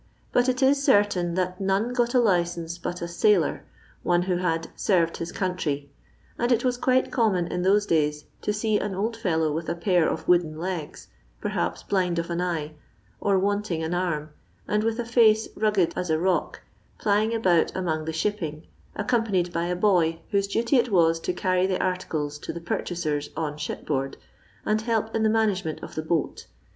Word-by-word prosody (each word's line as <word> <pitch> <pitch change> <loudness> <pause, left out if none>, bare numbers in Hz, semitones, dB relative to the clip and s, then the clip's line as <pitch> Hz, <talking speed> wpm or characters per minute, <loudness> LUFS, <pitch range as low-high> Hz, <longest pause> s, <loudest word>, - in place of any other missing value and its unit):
But 245 +1 +3
it 255 +1 0
is 275 +1 +4
certain 205 - +3
that 185 0 -2
none 195 +5 +1
got 240 0 +1
a - - +6
licence 175 -5 0
but 175 0 -4
a - - -2
sailor 170 0 +2 0.2
— - - -30
one. 175 0 +3
who 180 -1 0
had 165 -2 -1
*'senrcd 170 -5 +1
his 165 +1 -5
country;" 150 -7 -2 0.5
and 240 +1 +1
it 240 +1 +2
was 250 -1 +2
quite 255 +1 +1
common 210 -8 +2
in 180 +1 -3
those 200 +3 +3
days 150 -4 0 0.2
to - - 0
see 210 0 +1
an 205 -2 -3
old 220 +4 -1
fellow 160 -8 0
with 160 +1 -3
a - - -1
pair 175 -1 +2
of - - -4
wooden 170 -3 +3
legs, 170 -2 -5 0.3
perhaps 85 +7 -2
blind 180 -3 0
of 170 +1 -2
an 170 +1 -1
eye, 160 -4 -2 0.5
or 200 -1 +2
wanting 200 -3 0
an 160 +2 -2
arm, 160 -4 -2 0.4
and 210 0 +1
with 225 0 0
a 240 - -2
face 225 -2 +4
mggod 200 -6 +1
as 180 - -3
a 160 - +3
rock, 180 +2 0 0.4
plying 215 +1 +1
about 180 -7 +3
among 160 -4 -1
the 160 - -2
shipping, 160 -3 -3 0.3
accompanied 205 -6 0
by 170 0 0
a 180 - -1
boy 175 -4 +2
whose 200 -1 +1
duty 230 +6 +1
it 245 0 +2
was 165 -3 +4
to 170 - -2
carry 185 +1 +1
the 185 -1 -1
articles 155 -5 -2
to - - -5
the 170 - -6
purchasers 155 -3 -2
on 155 -2 -2
shipboard, 135 -2 -3 0.5
and 215 0 +1
help 225 -1 -1
in 225 - +1
the 220 - +3
management 205 -7 0
of - - -8
the 155 - -3
boat. 160 0 -2
180 Hz, 190 wpm, -25 LUFS, 165-210 Hz, 0.5 s, a